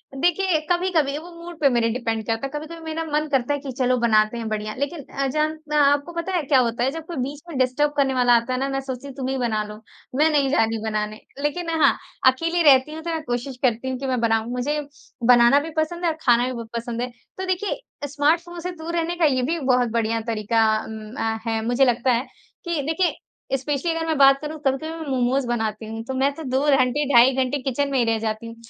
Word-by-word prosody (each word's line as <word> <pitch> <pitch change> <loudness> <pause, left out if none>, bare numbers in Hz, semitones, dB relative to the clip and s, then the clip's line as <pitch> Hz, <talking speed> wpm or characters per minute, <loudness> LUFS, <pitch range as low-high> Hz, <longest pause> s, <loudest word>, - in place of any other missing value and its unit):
देखिए, 350 +3 +2
कभी-कभी, 345 -6 +1
वो 330 +3 -9
मूड 345 -2 -9
पे 280 - +4
मेरे 235 -2 +2
डिपेंड 225 -2 -2
करता 225 +2 -1
है। - - -3
कभी-कभी 310 +3 -6
मेरा 320 0 -3
मन 305 0 -1
करता 270 0 +1
है 285 - -2
कि, 275 -1 -6
"चलो, 255 -1 +2
बनाते 215 -1 +3
हैं 230 -1 -4
बढ़िया।" 215 0 -3
लेकिन 285 +3 -3 0.2
अजन 305 +3 0
मैं 300 - +1
आपको 285 +2 +3
पता 340 +3 -3
है, 350 - +2
क्या 270 -1 +4
होता 235 -1 0
है? 265 - +1
जब 325 +1 -7
कोई 340 -1 -7
बीच 285 +3 -6
में 310 - -5
डिस्टर्ब 260 +3 +2
करने 270 -2 +2
वाला 250 -1 +4
आता 235 +2 0
है 255 - -1
ना, 270 +1 -1
मैं 270 0 -1
सोचती 265 0 -6
हूँ, 275 - -9
"तुम 265 -2 -4
ही 265 - -1
बना 225 -4 0
लो। 210 +1 -10 0.3
मैं 305 +4 +4
नहीं 285 -3 +2
जा 265 -5 +3
रही 225 0 -1
हूँ 220 - -5
बनाने।" 215 -1 -2 0.2
लेकिन 330 +4 -2
हाँ, 280 - +5 0.3
अकेली 330 +6 -1
रहती 265 +2 +5
हूँ, 320 - -6
तो 340 - -4
मैं 325 -1 -2
कोशिश 245 +1 -4
करती 250 +1 +1
हूँ 260 - -2
कि 270 - -4
मैं 255 -1 0
बनाऊँ। 225 0 +1
मुझे 265 +5 -1 0.5
बनाना 240 +3 +6
भी 305 +3 -5
पसंद 340 +3 -1
है 335 - +3
और 315 - -7
खाना 240 0 +4
भी 255 - -3
बहुत 230 -2 -7
पसंद 235 0 -4
है। 250 - -2 0.3
तो 380 - -3
देखिए 375 +4 -1 0.2
अ, - - 0
स्मार्टफ़ोन 325 +5 0
से 360 +2 -4
दूर 335 0 -6
रहने 340 +1 -1
का 340 -2 +2
ये 260 -4 +2
भी 330 +6 -1
बहुत 250 -3 +2
बढ़िया 230 0 0
तरीका 225 +1 +1
अम, 215 0 -6
अ, 225 0 -1
है। 225 -1 0
मुझे 245 +3 +3
लगता 245 +1 +2
है 240 +3 0 0.4
कि 340 -3 -1
देखिए, 345 +2 +1 0.4
स्पेशली 285 +5 -2
अगर 325 0 -2
मैं 320 -2 0
बात 275 0 +6
करूँ, 305 +1 -6
कभी-कभी 270 +4 0
मैं 325 -1 -7
मोमोज़ 255 0 +1
बनाती 220 -2 -2
हूँ, 225 +1 -6
तो 265 - -4
मैं 265 +2 +2
तो 320 - -7
2 260 -1 0 0.2
घंटे, 255 +3 +1
ढाई 240 +3 +7
घंटे 265 +1 0
किचन 280 +2 -1
में 270 - +1
ही 240 - +3
रह 225 -1 +1
जाती 220 +1 -3
हूँ। 230 - -9
270 Hz, 250 wpm, -23 LUFS, 235-310 Hz, 0.5 s, ढाई